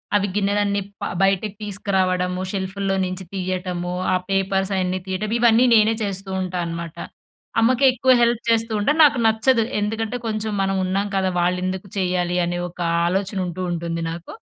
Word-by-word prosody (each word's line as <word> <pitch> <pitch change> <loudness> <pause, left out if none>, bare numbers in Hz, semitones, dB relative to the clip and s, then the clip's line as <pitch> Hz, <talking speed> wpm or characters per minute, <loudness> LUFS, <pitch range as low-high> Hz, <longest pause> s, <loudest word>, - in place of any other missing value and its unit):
అవి 205 0 +2
గిన్నెలన్నీ 200 0 +1 0.2
ప - - -4 0.2
బయటకు 195 +1 +1
తీసుకురావడము 185 -2 -1
షెల్ఫ్‌ల్లో 195 0 -2
నించి 185 0 -5
తీయ్యటము 180 -1 -3 0.2
ఆ - - +4
పేపర్స్ 195 0 0
అయన్నీ 185 0 -1
తీయటము 210 +4 -2
ఇవన్నీ 235 +1 +5
నేనే 220 +1 +5
చేస్తూ 195 -1 -4
ఉంటా 185 -1 -3
అనమాట. 170 -1 -6 0.6
అమ్మకేక్కువ 255 +2 +4
హెల్ప్ 235 0 +2
చేస్తూ 225 0 +2
ఉంటాను. 295 +10 +1
నాకు 285 -3 +3
నచ్చదు 225 +2 +3 0.2
ఎందుకంటే 220 +3 -2
కొంచెం 215 0 -2
మనం 195 0 0
ఉన్నాం 195 +2 0
కదా! 190 -1 +1
వాళ్ళెందుకు 185 +2 -1
చేయ్యాలి. 180 -1 0
అనే 175 0 -2
ఒక 180 - -20 0.3
ఆలోచన 195 +2 -1
ఉంటూ, 175 +2 -5
ఉంటుంది 170 0 -3
నాకు. 170 +1 -8
195 Hz, 150 wpm, -22 LUFS, 185-215 Hz, 0.6 s, ఇవన్నీ